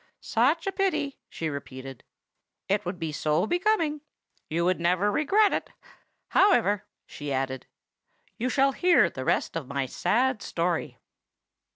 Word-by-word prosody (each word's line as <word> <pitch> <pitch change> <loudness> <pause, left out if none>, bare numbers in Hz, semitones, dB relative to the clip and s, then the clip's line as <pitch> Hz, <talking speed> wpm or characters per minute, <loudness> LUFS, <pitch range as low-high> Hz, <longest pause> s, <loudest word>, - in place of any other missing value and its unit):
"Such 275 +9 +1
a 390 - 0
pity!" 380 -8 -1
she 165 - -4
repeated. 135 -3 -7 0.6
"It 200 +1 0
would 180 +1 -3
be 165 -2 -3
so 155 +4 +1
becoming! 345 - +1 0.5
You 170 +2 0
would 185 0 +1
never 180 +4 +2
regret 390 - +3
it. - - -2 0.6
However," 225 - +3 0.2
she 145 -1 -7
added, 130 -1 -2 0.7
"you 250 +3 -2
shall 275 +1 +3
hear 345 - +4
the 130 - -6
rest - - 0
of 160 -6 -4
my 140 0 -2
sad 240 - 0
story. 165 -7 -2
195 Hz, 140 wpm, -27 LUFS, -, 0.7 s, hear